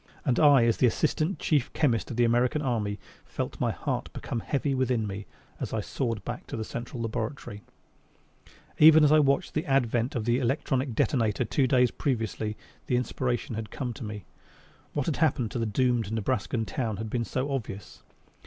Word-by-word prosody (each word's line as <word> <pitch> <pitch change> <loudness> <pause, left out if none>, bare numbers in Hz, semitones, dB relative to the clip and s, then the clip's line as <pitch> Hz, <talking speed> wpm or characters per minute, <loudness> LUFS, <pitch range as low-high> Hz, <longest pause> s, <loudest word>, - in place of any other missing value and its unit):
And 130 -5 +2
I, 145 -6 +6
as 115 - +1
assistant 155 - +2
chief 145 -4 +1
chemist 125 -8 +1
of 120 - -5
the 120 - +4
American 120 +5 +2
Army, 110 -6 -1 0.3
felt - - -5
my - - +2
heart - - -3
become 120 - -4
heavy 140 +4 -1
within 130 -4 +1
me 100 0 -6 0.3
as - - -4
I - - 0
soared 115 -6 -3
back 120 0 -5
to - - -5
the 110 - -2
Central 120 +2 -6
Laboratory. 115 -2 -4 1.2
Even 155 0 +8
as 150 - +5
I 155 - +7
watched 140 +4 +2
the 155 - -2
advent 125 0 +1
of 115 -3 -2
the 120 +1 +2
electronic 130 -1 0
detonator 115 -2 +1
two 130 +4 +1
days 125 -2 +4
previously 110 -4 -2 0.3
the 125 - +1
inspiration 125 0 -1
had 110 0 -5
come 125 -1 -4
to 120 - -8
me. 105 -3 -6 0.7
What 145 - -1
had 160 - -1
happened 130 -8 +1
to 120 - -3
the 115 - 0
doomed 120 -1 +1
Nebraskan 115 +1 -1
town 110 -5 -3
had 110 +1 -5
been 120 -1 0
so 130 +4 -2
obvious. 110 -7 -5
120 Hz, 180 wpm, -28 LUFS, 110-135 Hz, 1.2 s, Even